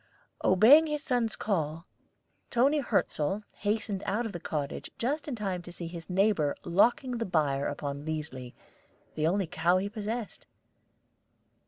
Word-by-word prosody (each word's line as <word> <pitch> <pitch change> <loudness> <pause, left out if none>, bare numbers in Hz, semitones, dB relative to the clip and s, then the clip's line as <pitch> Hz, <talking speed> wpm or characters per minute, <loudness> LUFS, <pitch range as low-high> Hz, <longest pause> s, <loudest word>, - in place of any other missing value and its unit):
Obeying 255 - +7
his 300 -1 -3
son's 245 -6 0
call, 165 -5 -2 0.6
Toni 275 +5 +3
Hirzel 195 - 0
hastened 205 -1 -1
out 225 +5 0
of 225 - -3
the 175 - -6
cottage 150 -4 -4
just 290 +5 -1
in 280 - -3
time 195 -5 -3
to 175 - -10
see 175 0 -7
his 165 0 -8
neighbor 185 -6 +2
locking 240 +7 +2
the - - 0
byre 145 -6 +1
upon 145 0 -4
Liesli, 150 -5 -5 0.6
the 155 0 0
only 195 +3 +1
cow 170 +2 +2
he 195 +2 -1
possessed. 215 +1 -5
195 Hz, 145 wpm, -29 LUFS, 160-230 Hz, 0.6 s, Obeying